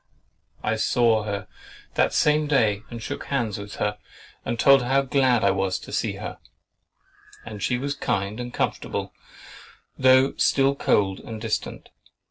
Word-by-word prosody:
I 110 +1 0
saw 110 -1 +2
her 100 -1 -4 0.5
that - - +2
same 150 0 +2
day 110 -8 +2
and 115 -2 -7
shook - - -5
hands 120 -7 -2
with 100 0 -8
her, 105 0 -2 0.4
and 115 - -3
told 135 +2 +6
her 120 - -4
how 135 +1 +3
glad 130 -3 +2
I 100 - +4
was 95 -1 0
to - - -11
see - - -1
her; - - -7 1.1
and 105 -2 -8
she 125 - 0
was 140 +3 -2
kind 105 -5 -2
and 120 0 -5
comfortable, - - -3 0.9
though 130 +1 +5
still 135 0 +3
cold 100 -8 +1
and 110 -1 -8
distant. 110 0 -4
115 Hz, 155 wpm, -24 LUFS, 105-135 Hz, 1.1 s, told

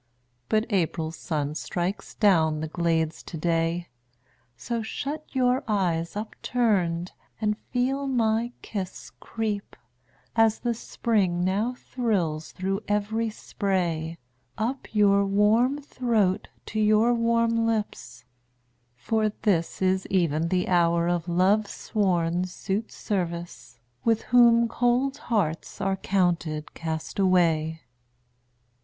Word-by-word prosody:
But 215 0 +2
April's 165 -4 0
sun 150 -3 -2
strikes 175 +4 -3
down 160 -7 +3
the 160 - -3
glades 165 -1 0
to 165 - -8
day; 165 +1 0 0.7
So 235 - -3
shut 285 +7 -4
your 255 +1 +2
eyes 175 -6 0
upturned, 205 -5 0 0.3
and 210 -1 +1
feel 270 +3 0
my 230 -2 +1
kiss 195 -4 -6
Creep, 215 -3 -4 0.6
as 225 -1 +4
the 240 -1 -1
Spring 200 -6 0
now 205 +7 0
thrills 185 -13 -2
through 195 +2 -2
every 215 +2 0
spray, 175 -6 -2 0.4
Up 240 +5 -2
your 200 -2 +4
warm 215 +7 +3
throat 230 -9 0 0.2
to 215 - -3
your 215 +3 +4
warm 230 -1 +2
lips: 125 - -3 0.7
for 215 - 0
this 190 -3 +1
Is 190 0 +1
even 165 -4 +1
the 180 +1 0
hour 170 -1 +3
of 175 -1 -1
Love's 195 +4 +2
sworn 180 -4 0
suitservice, 180 - -4 0.3
With 225 -1 +2
whom 235 -1 +5
cold 245 +4 +1
hearts 180 -9 -2
are 195 0 0
counted 175 -6 0
castaway. 160 -1 +1
195 Hz, 110 wpm, -26 LUFS, 170-225 Hz, 0.7 s, whom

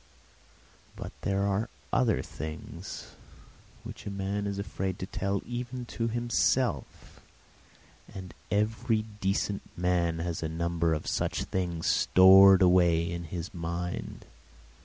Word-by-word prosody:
But - - -7
there 100 0 0
are 100 +3 0 0.2
other 115 -5 +2
things 80 0 -8 0.7
which - - -9
a - - -1
man 100 +1 -2
is 100 -1 -3
afraid 95 -2 -3
to - - -4
tell 100 +1 -2
even 125 +1 -5
to 115 - -1
himself, 120 +1 -1 0.9
and 95 -2 -9 0.2
every 110 +1 +1 0.2
decent 100 +1 0 0.2
man 85 -2 +1
has 85 0 -3
a 80 - -2
number 85 0 0
of 75 - -6
such - - -1
things 85 -3 -3
stored 95 +1 +7
away 85 -2 +4
in 85 0 -4
his 85 +2 -6
mind. 85 0 -5
95 Hz, 120 wpm, -29 LUFS, 85-100 Hz, 0.9 s, stored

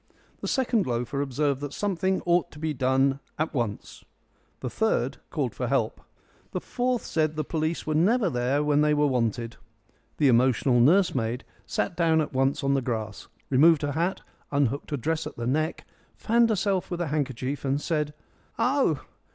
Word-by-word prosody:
The - - -5
second 240 - +1
loafer 125 +3 -1
observed 140 0 0
that 145 -1 -5
something 190 -1 -1
ought 175 0 +2
to - - -13
be 155 0 -2
done 135 +1 +2 0.2
at 155 +1 -1
once. 115 -7 -4 0.6
The 125 - -3
third 220 0 0
called - - -2
for - - -3
help. - - 0 0.5
The - - -1
fourth 250 -1 -1
said 155 -1 0
the 155 - -1
police 160 +1 -2
were 155 - -1
never 200 +8 +3
there 130 0 0
when 150 0 +3
they 150 0 +3
were 150 0 +3
wanted. 115 -3 -1 0.6
The 150 - +4
emotional 125 0 +3
nursemaid 130 - +3 0.2
sat 180 - -1
down 165 -2 +3
at 150 - -2
once 135 +2 +1
on 140 0 +2
the 135 - +2
grass, 110 -4 -4 0.2
removed 155 +3 +5
her 145 - 0
hat, 170 +6 -1 0.3
unhooked 140 -1 0
her 145 - -1
dress 160 +5 -1
at - - -10
the 120 - -3
neck, 155 +6 -1 0.3
fanned 230 +1 +3
herself 200 -3 0
with 175 - -3
a 175 - -1
handkerchief, 140 -2 -2
and 135 +1 0
said, 150 -1 -2 0.4
"Oh! 245 - +1
150 Hz, 175 wpm, -26 LUFS, 130-170 Hz, 0.6 s, removed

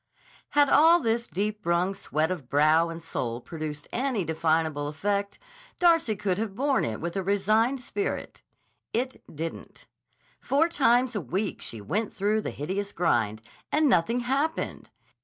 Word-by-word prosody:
Had 290 -1 +7
all 330 +5 +6
this 235 -3 0
deep 210 +2 -2
wrung 170 +3 +1
sweat 160 -4 -1
of 150 -9 -5
brow 155 +4 +4
and 165 0 -7
soul 120 -7 -3
produced 150 +1 -6
any 250 -7 -1
definable 160 -2 0
effect, 200 +6 -2 0.4
Darcy 330 -10 +4
could 195 -2 -1
have 215 -3 -3
borne 275 +3 +1
it 110 -2 -3
with 170 +2 -4
a 195 - 0
resigned 215 +7 +2
spirit. 405 - -4 0.5
It 255 +3 -2
didn't. 165 +2 -7 0.5
Four 290 +5 +2
times 250 -5 +3
a 205 - -1
week 185 - -3
she 115 - -6
went 205 - -2
through 210 +2 +1
the - - -3
hideous 195 +7 -3
grind, 115 - 0 0.3
and 305 0 +3
nothing 235 +1 +2
happened. 275 +6 -2
200 Hz, 150 wpm, -27 LUFS, 160-245 Hz, 0.5 s, Had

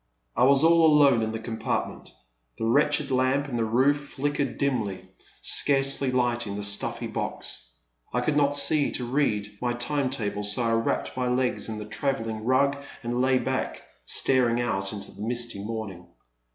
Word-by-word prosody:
I - - +4
was 140 +2 +5
all 165 0 +5
alone 145 -6 +5
in 110 0 -1
the 110 - -3
compartment. 110 0 -4 0.5
The - - -2
wretched 145 +3 +2
lamp 130 +2 +1
in 130 - -4
the 115 - +1
roof 140 +6 +1
flickered 145 +1 -1
dimly, 120 -9 -1 0.4
scarcely 135 -1 +2
lighting 120 -4 0
the 105 - -4
stuffy 100 0 -1
box. - - -5 0.4
I 125 - 0
could 145 +4 0
not 145 -1 +2
see 150 0 +2
to 125 - -2
read 105 -6 -1
my 120 -1 0
time 130 +3 -1
table, 105 -6 -3
so 105 +4 +1
I 115 - +1
wrapped 115 0 -1
my 125 -1 -1
legs 125 -1 0
in 110 - -4
the 105 - -6
trav 135 +5 -1
elling 110 -1 -5
rug 140 +3 +3 0.3
and 120 +1 -1
lay 130 0 +3
back, - - -2 0.2
staring 120 - +2
out 95 -5 -1
into 105 -2 -6
the 100 - -12
misty 120 -3 -3
morning. 105 -5 -6
125 Hz, 175 wpm, -26 LUFS, 110-140 Hz, 0.5 s, was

